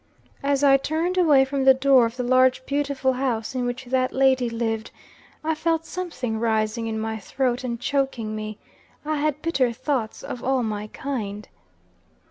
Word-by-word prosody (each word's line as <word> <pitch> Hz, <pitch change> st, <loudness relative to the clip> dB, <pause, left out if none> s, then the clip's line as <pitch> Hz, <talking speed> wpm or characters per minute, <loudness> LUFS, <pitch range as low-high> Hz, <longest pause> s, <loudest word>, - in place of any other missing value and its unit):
"As 280 Hz, 0 st, +1 dB
I 275 Hz, -1 st, +7 dB
turned 320 Hz, +6 st, -1 dB
away 300 Hz, -7 st, +5 dB
from 270 Hz, 0 st, -2 dB
the 265 Hz, 0 st, +7 dB
door 265 Hz, -3 st, +5 dB
of 230 Hz, +2 st, -10 dB
the 250 Hz, -, -1 dB
large, 255 Hz, +1 st, +3 dB
beautiful 280 Hz, -2 st, 0 dB
house 250 Hz, -3 st, -2 dB
in 250 Hz, -1 st, -1 dB
which 250 Hz, +2 st, -4 dB
that 255 Hz, +1 st, 0 dB
lady 260 Hz, -2 st, +3 dB
lived, 225 Hz, -1 st, -2 dB, 0.5 s
I 320 Hz, +1 st, +1 dB
felt 325 Hz, +1 st, 0 dB
something 260 Hz, -13 st, -4 dB
rising 220 Hz, 0 st, 0 dB
in 220 Hz, -1 st, -2 dB
my 220 Hz, 0 st, -3 dB
throat 250 Hz, +4 st, -1 dB
and 235 Hz, -2 st, -3 dB
choking 255 Hz, -5 st, -1 dB
me; 215 Hz, -1 st, -5 dB, 0.5 s
I 310 Hz, 0 st, -1 dB
had 300 Hz, 0 st, -1 dB
bitter 270 Hz, -7 st, +1 dB
thoughts 255 Hz, -2 st, -3 dB
of 245 Hz, -, -6 dB
all 260 Hz, -1 st, +1 dB
my 210 Hz, -1 st, -3 dB
kind. 210 Hz, -5 st, -5 dB
260 Hz, 170 wpm, -24 LUFS, 230-275 Hz, 0.5 s, I